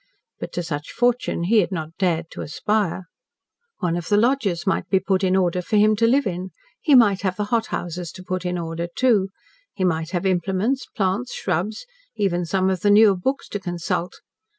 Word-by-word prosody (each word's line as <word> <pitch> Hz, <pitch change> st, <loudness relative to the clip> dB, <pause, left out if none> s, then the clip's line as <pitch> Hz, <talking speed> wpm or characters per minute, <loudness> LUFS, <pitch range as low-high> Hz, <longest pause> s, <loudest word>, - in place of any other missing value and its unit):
But -, -, -6 dB
to 175 Hz, -, -2 dB
such 150 Hz, -3 st, -5 dB
fortune 245 Hz, -7 st, 0 dB
he 215 Hz, +5 st, +4 dB
had 200 Hz, -, +1 dB
not 160 Hz, -2 st, -5 dB
dared 170 Hz, -3 st, 0 dB
to -, -, -7 dB
aspire. 200 Hz, +3 st, -1 dB, 0.8 s
One 170 Hz, -3 st, 0 dB
of 175 Hz, -2 st, -4 dB
the 205 Hz, -, +4 dB
lodges 215 Hz, -7 st, +1 dB
might 190 Hz, -, 0 dB
be 190 Hz, -, +3 dB
put 190 Hz, 0 st, 0 dB
in 185 Hz, 0 st, +3 dB
order 180 Hz, -1 st, +1 dB
for 215 Hz, -, -2 dB
him 215 Hz, +1 st, +5 dB
to 230 Hz, +1 st, +3 dB
live 275 Hz, +4 st, +3 dB
in. 185 Hz, 0 st, -3 dB, 0.3 s
He 295 Hz, -4 st, +4 dB
might 205 Hz, -6 st, +5 dB
have 190 Hz, -2 st, -1 dB
the 210 Hz, -, -2 dB
hothouses 175 Hz, -6 st, -2 dB
to 185 Hz, -, -10 dB
put 185 Hz, 0 st, -3 dB
in 180 Hz, 0 st, -2 dB
order, 165 Hz, 0 st, -4 dB
too; 220 Hz, -7 st, +3 dB, 0.5 s
he 190 Hz, -, -2 dB
might 160 Hz, -3 st, 0 dB
have 175 Hz, +1 st, -2 dB
implements, 190 Hz, +8 st, 0 dB
plants, 200 Hz, +3 st, -2 dB
shrubs, 190 Hz, -, -2 dB, 0.3 s
even 180 Hz, -3 st, 0 dB
some 190 Hz, +2 st, +1 dB
of 185 Hz, -, -1 dB
the 205 Hz, -, +2 dB
newer 205 Hz, -1 st, +6 dB
books 265 Hz, +10 st, -2 dB
to 205 Hz, -, -3 dB
consult. 175 Hz, -1 st, -3 dB
190 Hz, 195 wpm, -22 LUFS, 175-210 Hz, 0.8 s, newer